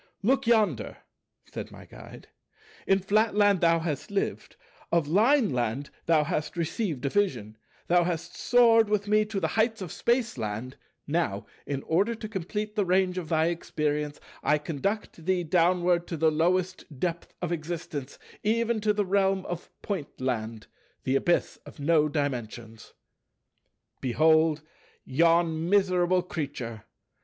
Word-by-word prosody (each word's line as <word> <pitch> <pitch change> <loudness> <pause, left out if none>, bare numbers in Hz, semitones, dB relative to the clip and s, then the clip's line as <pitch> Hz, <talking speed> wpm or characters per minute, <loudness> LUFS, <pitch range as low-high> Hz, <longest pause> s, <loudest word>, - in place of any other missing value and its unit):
"Look 265 +3 +2
yonder," 220 -3 +2 0.5
said - - -7
my - - -13
Guide, - - -13 0.6
"in 195 - +5
Flatland 205 0 +2
thou 165 -1 +4
hast 160 -4 -3
lived; 200 -1 -3 0.4
of 170 -3 +2
Lineland 150 - +2 0.2
thou 160 -2 +4
hast 150 +2 -3
received 165 - -2
a - - +2
vision; 125 - -1 0.3
thou 175 0 +4
hast 170 -1 -3
soared 230 -3 +4
with 210 -1 0
me 215 +1 +3
to 210 -2 -3
the 160 -4 -1
heights 220 +4 +1
of 185 -4 -6
Spaceland; 130 - -1 0.3
now, 145 -11 -1 0.2
in 135 -1 -3
order 200 +8 +1
to 220 -1 -7
complete 210 +2 -4
the 210 - +2
range 185 0 +1
of 165 - -7
thy 160 0 +2
experience, 150 -3 -2 0.2
I 150 - +3
conduct 165 +4 -3
thee 185 +1 +1
downward 175 +1 +2
to 165 - -4
the 160 +1 +3
lowest 175 -2 -1
depth 170 +1 -3
of 175 -1 -3
existence, 155 -4 -5 0.2
even 230 +1 +1
to 210 0 +2
the 205 -1 0
realm 195 0 +1
of 175 -1 -6
Pointland, 125 - -3 0.4
the 130 - 0
Abyss 175 +5 +1
of - - -14
No 150 +1 +3
dimensions. 120 -6 -4 1.1
"Behold 155 +3 +3 0.4
yon 165 +2 +2
miserable 185 -2 +3
creature. 130 -10 -5
170 Hz, 135 wpm, -27 LUFS, 150-200 Hz, 1.1 s, in